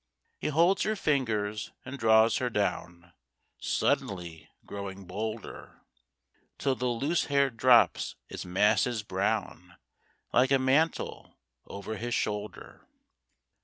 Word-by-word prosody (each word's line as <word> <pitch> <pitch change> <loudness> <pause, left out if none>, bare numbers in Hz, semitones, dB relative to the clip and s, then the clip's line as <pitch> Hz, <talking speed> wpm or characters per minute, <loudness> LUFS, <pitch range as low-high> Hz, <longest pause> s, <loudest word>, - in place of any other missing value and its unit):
He - - -2
holds 170 +6 +3
her 215 +1 0
fingers 110 - -1
and 135 +1 -7
draws 110 0 +5
her 125 - -1
down, 90 -5 -3 0.5
Suddenly 85 -5 -2 0.2
growing 100 -1 -7
bolder, 110 +4 -6 0.7
Till 135 - +1
the 125 0 -2
loose 140 +8 0
hair 140 -2 +2
drops 120 +1 +4
its - - -7
masses 105 +5 +2
brown 90 -3 -2 0.6
Like 125 +2 +4
a 135 - +5
mantle 135 +5 0 0.3
over 100 +2 -6
his 120 0 -2
shoulder. 105 0 -4
110 Hz, 110 wpm, -29 LUFS, 100-130 Hz, 0.7 s, draws